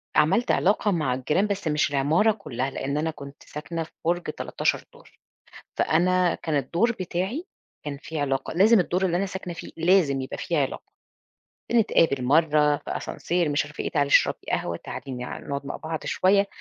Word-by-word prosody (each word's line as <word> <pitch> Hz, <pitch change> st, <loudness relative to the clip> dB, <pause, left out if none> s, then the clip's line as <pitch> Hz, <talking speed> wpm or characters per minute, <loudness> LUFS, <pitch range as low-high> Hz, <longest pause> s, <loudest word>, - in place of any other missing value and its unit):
عملت 185 Hz, +11 st, +3 dB
علاقة 205 Hz, +2 st, +2 dB
مع 155 Hz, -8 st, 0 dB
الجيران، 150 Hz, +10 st, +1 dB
بس 200 Hz, -4 st, -3 dB
مش 150 Hz, -1 st, +1 dB
العمارة 155 Hz, +10 st, +3 dB
كلّها، 135 Hz, -, -4 dB
لإن 140 Hz, +1 st, -3 dB
أنا 160 Hz, +2 st, 0 dB
كنت 140 Hz, -2 st, -12 dB
ساكنة 165 Hz, +2 st, -5 dB
في 160 Hz, -, -14 dB
برج 175 Hz, +1 st, +1 dB
13 155 Hz, -, -2 dB
دور، -, -, -18 dB, 0.7 s
فأنا 180 Hz, +1 st, +2 dB
كان 160 Hz, -2 st, -3 dB
الدور 170 Hz, -, +1 dB
بتاعي 190 Hz, -, -3 dB, 0.4 s
كان 145 Hz, -1 st, -4 dB
في 160 Hz, -1 st, -5 dB
علاقة، 135 Hz, -1 st, -1 dB
لازم 205 Hz, +5 st, +5 dB
الدور 180 Hz, +2 st, +1 dB
اللي 175 Hz, -1 st, +1 dB
أنا 195 Hz, -, 0 dB
ساكنة 190 Hz, -2 st, -6 dB
فيه -, -, -9 dB
لازم 165 Hz, -5 st, +3 dB
يبقى 130 Hz, -, -6 dB
في 170 Hz, -, -2 dB
علاقة. 135 Hz, -2 st, -3 dB, 0.8 s
بنتقابل 165 Hz, -, +3 dB
مرّة 150 Hz, +1 st, +3 dB
في -, -, -11 dB
ascenseur 175 Hz, -1 st, -1 dB
مش 145 Hz, -, +1 dB
عارفة 150 Hz, -, -7 dB
إيه، -, -, -2 dB
تعالي 145 Hz, -2 st, +2 dB
اشربي -, -, +4 dB
قهوة، 85 Hz, 0 st, -1 dB
تعالي 135 Hz, -, -7 dB
ن 125 Hz, -1 st, -6 dB
نقعد 140 Hz, 0 st, -3 dB
مع -, -, -4 dB
بعض 160 Hz, 0 st, -5 dB
شوية، 200 Hz, +2 st, +3 dB
160 Hz, 175 wpm, -25 LUFS, 140-185 Hz, 0.8 s, لازم